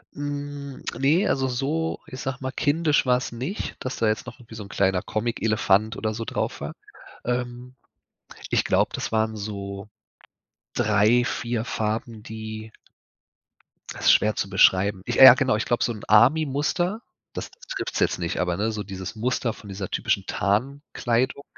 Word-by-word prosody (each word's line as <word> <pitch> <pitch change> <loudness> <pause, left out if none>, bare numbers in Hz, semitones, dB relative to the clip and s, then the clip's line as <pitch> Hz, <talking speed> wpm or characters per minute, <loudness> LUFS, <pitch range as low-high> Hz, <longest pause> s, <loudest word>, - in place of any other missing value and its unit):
Hm, 145 -1 -5
ne, 155 +9 +3
also 135 -1 +1
so, 145 +6 -1
ich 130 - -8
sage 135 -2 -3
mal, 130 0 -3
kindisch 150 +2 +2
war's 125 0 +1
nicht, 130 - -4
dass 130 - -4
da 115 - +1
jetzt 110 0 0
noch - - -10
irgendwie 115 -2 -13
so 110 - -6
'n 100 - -12
kleiner 95 -2 +1
Comic-Elefant 110 -1 +1
oder 110 -1 -2
so 115 +1 -5
drauf - - -3
war. - - -5 0.5
Ähm, 125 +1 -3 0.7
ich - - +2
glaube, - - +2
das - - -3
waren 110 0 +1
so 100 -1 -6 0.9
3, 105 +4 +3
4 115 -2 -2
Farben, 110 0 -3
die 110 0 -7 1.2
das - - -7
ist - - +9
schwer 105 0 +3
zu 100 - -2
beschreiben. 95 0 +4
Ich 120 - -1
äh, 135 - +12
ja 130 - +12
genau! 130 -2 +1
Ich 105 - -1
glaube 120 - +1
so 120 - 0
'n 105 - -10
Army-Muster, 150 - +3 0.3
das - - -5
t - - -23
trifft's - - -3
jetzt - - +2
nicht, 85 +1 -2
aber, 90 -1 0
ne, 110 +3 0
so 105 -1 -4
dieses 95 +1 -7
Muster 120 0 -1
von 105 - -13
dieser 95 -1 -5
typischen 95 - 0
Tarnkleidung, 125 +4 -1
115 Hz, 170 wpm, -24 LUFS, 105-130 Hz, 1.2 s, äh